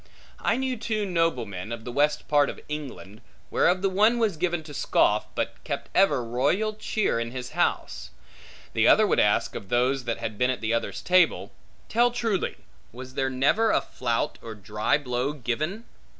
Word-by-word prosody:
I 230 - +1
knew 260 -1 -1
two 215 -1 -2
noblemen, 125 - -1
of 115 -1 -6
the 125 - -5
west 150 +3 +1
part 145 -1 +3
of - - -7
England, 130 -8 -7 0.3
whereof 180 +2 +2
the 195 - +3
one 215 +5 +3
was 220 -6 +1
given 175 0 -1
to 150 -1 -10
scoff, - - +2
but - - -3
kept - - -5
ever 185 -11 +3
royal 145 - 0
cheer 215 - -1
in 115 0 -3
his 125 0 -6
house; - - -1 0.6
the - - +3
other - - +6
would - - +2
ask, - - +2
of 95 - -8
those 125 +2 +1
that 115 - -2
had 110 -2 -5
been 125 - +3
at 130 - -1
the 110 0 0
other's 115 - -2
table, 185 +1 +3 0.4
Tell 240 +2 +3
truly, 230 -6 -1 0.4
was 130 +2 -10
there 135 0 0
never 140 +13 +2
a - - +3
flout 120 -2 -2
or 115 -1 -8
dry 105 +5 0
blow 130 0 -2
given? 150 - -3
145 Hz, 180 wpm, -26 LUFS, 120-190 Hz, 0.6 s, other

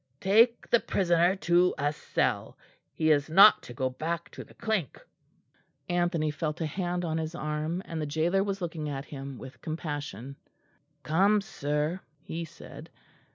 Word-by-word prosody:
"Take 230 +5 +4
the 235 - +6
prisoner 175 -2 +2
to 180 -1 +3
a 145 +1 0
cell; - - -1 0.3
he 155 -1 +1
is 145 0 +2
not 195 +6 +8
to - - -11
go 130 - 0
back 165 +5 -4
to - - -8
the - - -19
Clink." 215 - -2 0.9
Anthony 175 -3 0
felt 150 0 -3
a 165 - -1
hand 175 +2 -2
on 160 -1 -1
his 160 +1 -4
arm, 155 +3 -3
and 165 -1 -4
the 150 - -2
gaoler 165 +6 +1
was 195 -1 -3
looking 160 -3 -4
at 140 0 -4
him 135 -2 -8
with 130 +2 -11
compassion. 145 - -5 0.7
"Come, 195 +9 +3
sir," 150 -3 -2 0.2
he 165 +1 -5
said. 160 - -12
160 Hz, 155 wpm, -28 LUFS, 150-180 Hz, 0.9 s, not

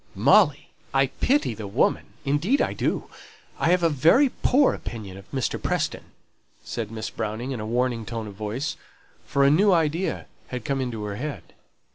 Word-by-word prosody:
"Molly! - - +4 0.2
I 135 0 +5 0.2
pity 270 - +2
the 105 -1 -7
woman! 105 +7 +1 0.2
Indeed 160 - +2
I - - +1
do. - - -1 0.5
I - - +2
have 180 0 +3
a - - +6
very 165 - +4
poor 265 +3 +3
opinion 105 -5 -7
of 95 0 -13
Mr. 130 -4 -2
Preston," - - -1 0.6
said 115 -3 -4
Miss 110 0 -5
Browning, 110 +4 -4
in 125 - -3
a 110 - -4
warning 120 0 0
tone 115 0 -5
of 105 - -8
voice; 110 +9 -4 0.5
for 140 - +2
a 140 - +6
new 195 +7 +5
idea 165 +1 +1 0.2
had 125 -3 -6
come 135 -1 0
into 120 -4 -3
her 100 -1 -4
head. 145 +3 -6
130 Hz, 175 wpm, -25 LUFS, 110-160 Hz, 0.6 s, a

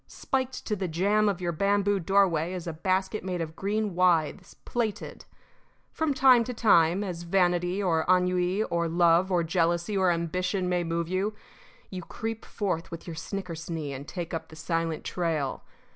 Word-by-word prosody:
Spiked 260 -1 -3
to 210 - -1
the 190 -2 -3
jamb 200 +6 +2
of 190 -2 -3
your 175 -1 0
bamboo 200 +3 +1
doorway 180 -2 +2
is 180 -2 -5
a 165 - -4
basket 190 +5 -1
made 185 -1 -3
of 160 -1 -4
green 205 +2 -1
withes, 175 0 +1
plaited. 220 -4 -3 0.7
From 315 -3 -1
time 260 -3 +6
to 250 - -5
time, 185 -4 +4
as 180 -4 -5
vanity 180 +1 +1
or 165 -4 +2
ennui 180 +2 +2
or 170 -4 -1
love 170 +2 +3
or 175 -2 +2
jealousy 170 +3 0
or 190 -2 +3
ambition 180 +2 -1
may 180 -1 +1
move 165 0 -2
you, 190 +4 -1 0.6
you 185 -1 -5
creep 225 +5 -5
forth 185 -5 -3
with 165 -1 -8
your 170 - -6
snickersnee 165 -4 -5
and 140 +2 -8
take 175 -1 -5
up 165 - -4
the 160 - -12
silent 165 0 -2
trail. 160 -6 -2
180 Hz, 170 wpm, -27 LUFS, 165-200 Hz, 0.7 s, time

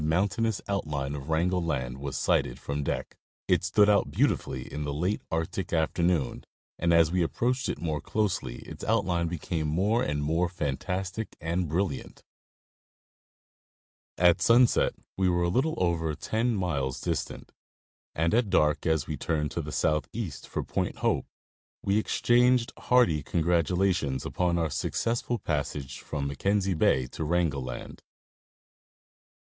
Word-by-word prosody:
mountainous 100 +7 +1
outline 75 -8 -2
of 70 +1 -6
Wrangel 90 +3 +1
land 65 -6 -2
was 70 -1 -4
sighted - - +1
from 70 +1 -3
deck. - - -3 0.3
It - - +3
stood 105 -1 +4
out 105 -1 +3
beautifully 65 - 0
in 75 +3 -5
the 70 -1 -3
late 90 +7 0
Arctic 80 +3 -2
afternoon, 85 -3 +1 0.4
and 85 0 +2
as 85 -1 +5
we 90 0 +1
approached 125 +9 0
it - - -2
more 80 -4 -2
closely 105 -4 -2
its - - -10
outline 85 -2 +1
became 80 -1 -2
more 100 +10 +2
and 75 -6 -1
more 85 +4 +1
fantastic 90 +6 -3
and 85 +2 -1
brilliant. 85 -4 -2 1.9
At 90 -1 +4
sunset 120 +1 +5 0.2
we 95 -1 +3
were 85 0 +2
a 85 - +2
little 135 - +1
over 80 -3 0
ten 115 +7 0
miles 70 -9 -1
distant, - - -4 0.6
and 80 +2 +1
at 115 -2 +2
dark, 75 -4 +2
as 80 -4 +2
we - - -4
turned 75 -2 -1
to - - -2
the - - -6
southeast 75 +2 -2
for - - -3
Point - - -2
Hope, - - +1 0.6
we 100 +2 +2
exchanged 120 +2 +3
hearty 120 -12 +3
congratulations 85 -2 +1
upon 90 -1 0
our 80 -3 0
successful 120 - -1
passage 70 - -3
from 70 -2 -4
Mackenzie 95 +8 0
Bay 65 -5 +3
to 65 - -6
Wrangel 80 -3 +1
land. 65 -1 -7
85 Hz, 145 wpm, -28 LUFS, 75-95 Hz, 1.9 s, as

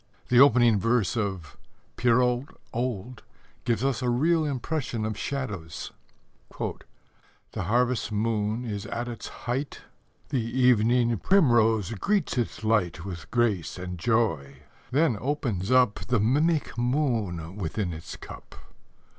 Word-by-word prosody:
The 125 - +5
opening 120 -5 +6
verse 115 -1 +1
of 95 -8 -3 0.4
Pierrot 125 +1 +2 0.3
Old 120 -1 -3 0.4
gives 115 -1 0
us 135 -2 0
a 125 - 0
real 160 +7 +2
impression 135 -4 -2
of 110 -1 -2
shadows: 105 - -5 0.7
The 95 - -8
harvest 120 +2 +1
moon 110 +2 -1
is 105 -3 -4
at 120 +1 -3
its 120 -2 -6 0.2
height, 130 +4 -3 0.5
The 130 -5 0
evening 120 0 +3
primrose 120 - +3
greets 200 - 0
its 120 -2 -2
light 95 -7 +1
With 90 -4 -7
grace 105 -10 0
and 90 -1 -6
joy: 80 - 0 0.3
then 135 -5 +2
opens 120 -9 -2
up 125 -4 +4
The 125 -1 +2
mimic 145 +8 +1
moon 115 - -1
within 95 0 -2
its 80 0 -8
cup. - - -11
115 Hz, 120 wpm, -27 LUFS, 105-125 Hz, 0.7 s, opening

